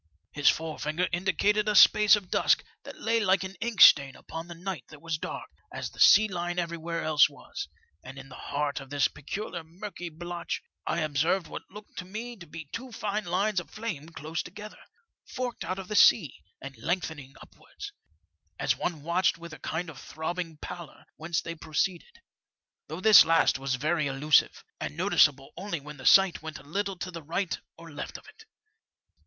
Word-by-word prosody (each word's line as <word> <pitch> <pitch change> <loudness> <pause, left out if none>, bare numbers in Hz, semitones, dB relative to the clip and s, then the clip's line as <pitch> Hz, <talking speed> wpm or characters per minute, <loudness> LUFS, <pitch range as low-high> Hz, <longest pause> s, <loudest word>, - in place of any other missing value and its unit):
His 145 0 +4
forefinger 160 +2 -1
indicated 200 +4 +1
a 210 - +1
space 210 +2 +8
of 200 -4 -7
dusk - - +3 0.2
that - - -9
la^y 225 0 0
like 190 -1 +3
an 190 0 -6
ink 230 -3 -1
stain 140 -2 +8
upon 165 +1 -8
the 170 - -9
night 175 -6 -5
that 150 - -13
was 165 0 -3
dark, - - -6 0.2
as - - -5
the - - -16
sea 215 +2 +7
line 175 -2 -3
everywhere 170 -1 -3
else 155 -2 +5
was; - - -8 0.4
and 135 +2 -10
in 135 0 -10
the 135 - -13 0.2
heart 145 0 -1
of 135 - -11
this 145 -1 +2
peculiar 170 +3 -6
murky 175 +2 -8
blotch 175 +2 -5 0.2
I 170 - 0
observed 155 +5 +1
what - - -9
looked 210 +2 -11
to 180 - -6
me 225 +6 -6
to 175 -3 -12
be 160 +1 -8
two 255 +2 -6
fine 215 -1 -3
lines 190 +3 +1
of 175 - -10
flame 190 -9 -6
close 160 0 -4
together, 210 0 -10 0.4
forking 250 -3 -5
out 185 - -2
of 190 -1 -7
the 210 - -4
sea, 170 - +6 0.3
and 140 0 -9
lengthening 160 -3 -3
upwards, 410 0 -11 0.6
as - - +1
one 160 -5 -4
watched 175 +3 +1
with 170 -1 -10
a - - -10
kind 175 +3 -3
of 150 -4 -10
throbbing 165 0 -5
pallor 170 +1 -9
whence 160 +1 -2
they 165 - -5
proceeded, 170 - -3 0.7
though 160 +4 -6
this 215 0 +9
last 165 -4 +3
was 135 -1 -1
very 155 +3 0
elusive, 140 +3 +2 0.2
and 150 - -5
noticeable 145 -7 +3
only 190 -3 -4
when 150 +1 -10
the 130 - -3
sight 195 -3 +6
went 160 -1 -7
a - - -14
little 195 +5 -3
to 185 +1 -5
the 165 -1 -7
right 170 +4 -2 0.2
or 165 0 -12
left 145 - -6
of - - -17
it. 435 +1 -16
170 Hz, 190 wpm, -28 LUFS, 155-195 Hz, 0.7 s, this